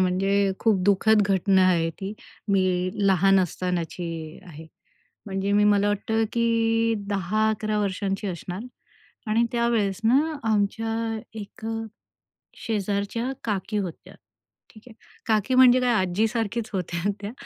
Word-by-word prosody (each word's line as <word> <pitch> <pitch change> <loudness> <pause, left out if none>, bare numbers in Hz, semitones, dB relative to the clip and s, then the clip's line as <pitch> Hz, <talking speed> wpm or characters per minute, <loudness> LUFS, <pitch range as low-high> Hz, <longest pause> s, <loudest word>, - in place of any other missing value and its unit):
म्हणजे 195 +2 +2
खूप 215 -4 +2
दुःखद 210 +2 +4
घटना 190 0 +3
आहे 170 -3 +2
ती. 195 +5 -7 0.4
मी 185 -2 +1 0.2
लहान 195 0 +4
असतानाची 170 -2 -4
आहे. 160 -2 -11 0.6
म्हणजे 195 0 -2
मी 205 0 +4
मला 205 0 +3
वाटतं, 220 +2 0
की 230 -1 +1
10-11 215 +2 0
वर्षांची 195 0 -2
असणार 180 +1 -5 0.7
आणि 230 +2 +3
त्यावेळेस 230 -4 0
ना 285 +7 +3
आमच्या 225 +1 -1 0.2
एक 210 +2 -10 1.0
शेजारच्या 210 +2 -2
काकी 210 0 -2
होत्या, 185 -5 -6 0.6
ठीक 215 - -17
आहे. 235 - -13 0.3
काकी 220 +3 +1
म्हणजे 255 -1 +7
काय 245 -1 +2
आजीसारखीच 220 +3 -1
होत्या 180 +1 -2
त्या. 205 +1 -5
205 Hz, 115 wpm, -25 LUFS, 190-225 Hz, 1.0 s, म्हणजे